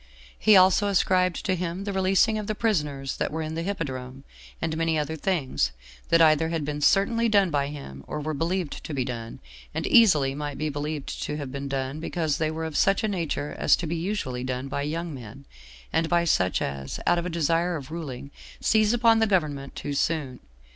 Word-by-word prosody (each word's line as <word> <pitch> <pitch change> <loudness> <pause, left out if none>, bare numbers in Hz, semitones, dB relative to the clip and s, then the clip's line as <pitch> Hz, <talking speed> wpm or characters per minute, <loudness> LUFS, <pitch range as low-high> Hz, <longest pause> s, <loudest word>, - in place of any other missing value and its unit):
He 215 - +6
also 190 +2 +5
ascribed 185 -2 +2
to 190 - +2
him 180 +1 -3
the 200 0 -3
releasing 195 +3 +3
of 210 - -5
the 215 - -1
prisoners 150 - -1
that - - -1
were 160 +1 -3
in 155 0 -4
the 165 - -2
hippodrome, 135 -8 -4 0.4
and 160 -1 -2
many 165 0 +1
other 155 +1 -2
things, 150 - 0 0.4
that 165 - +5
either 160 0 +4
had 165 -3 -2
been 150 0 -3
certainly 230 +8 +3
done 200 -4 +3
by 140 -2 +1
him, 105 - -8
or 150 - -4
were 155 +1 -3
believed 165 +2 -2
to 150 - -5
be 130 -2 0
done, 115 -3 -6 0.4
and - - -2
easily 155 - +5
might 145 -1 -5
be 155 +1 -1
believed 150 0 -4
to 150 - -3
have 140 -3 -5
been 140 +1 -5
done, 135 +1 -3
because 160 -2 -1
they 155 -1 +1
were 160 +1 -4
of 160 -2 -6
such 195 +6 +3
a - - +2
nature 165 -7 -3
as - - +5
to 170 - -5
be 165 +2 -2
usually 165 -9 -3
done 130 +1 -3
by 140 - -3
young 165 +3 -3
men, 130 +1 -10 0.5
and 160 0 +1
by 175 0 +3
such 95 - +2
as, 70 -1 -4
out 175 0 +3
of 170 - -3
a - - -3
desire 170 +1 +1
of 140 -2 -7
ruling, 140 -5 -6 0.3
seize 215 0 +3
upon 230 -1 +4
the 220 - +3
government 150 -8 -1
too 145 - -4
soon. 140 -4 -1
160 Hz, 210 wpm, -26 LUFS, 140-180 Hz, 0.5 s, He